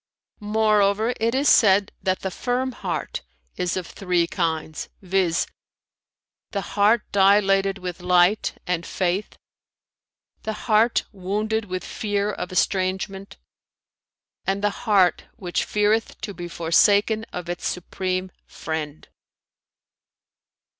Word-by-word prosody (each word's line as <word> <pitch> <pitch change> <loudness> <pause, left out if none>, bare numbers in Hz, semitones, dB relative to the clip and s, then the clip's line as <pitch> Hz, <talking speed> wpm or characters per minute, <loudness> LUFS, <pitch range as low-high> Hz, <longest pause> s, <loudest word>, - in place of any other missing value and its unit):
Moreover, 215 +1 +2
it 230 +2 +1
is 280 +2 +2
said 200 -2 +5
that 185 -1 0
the 190 - -3
firm 255 +5 -1
heart - - -4 0.3
is 180 0 -1
of 185 - -3
three 180 -2 0
kinds, 160 -3 -3
viz., 185 -2 +1 1.0
the 200 -3 -2
heart 210 +2 +4
dilated 195 0 +4
with 180 -1 -6
light 180 +3 +3
and 175 -1 -1
faith, 185 +4 -2 1.0
the 220 - -3
heart 225 +1 +3
wounded 210 +3 -2
with 185 -1 -4
fear 205 -2 -2
of 180 - -5
estrangement, 190 +1 -1 1.1
and 195 +1 0
the 205 - +3 0.2
heart 190 -4 +4
which 175 -3 -2
feareth 210 +2 +1
to 205 - -5
be 175 -2 -6
forsaken 200 +6 +3
of 180 -1 -6
its 175 0 -3
Supreme 185 +1 -3 0.2
Friend." 155 -2 -5
195 Hz, 115 wpm, -23 LUFS, 180-210 Hz, 1.1 s, said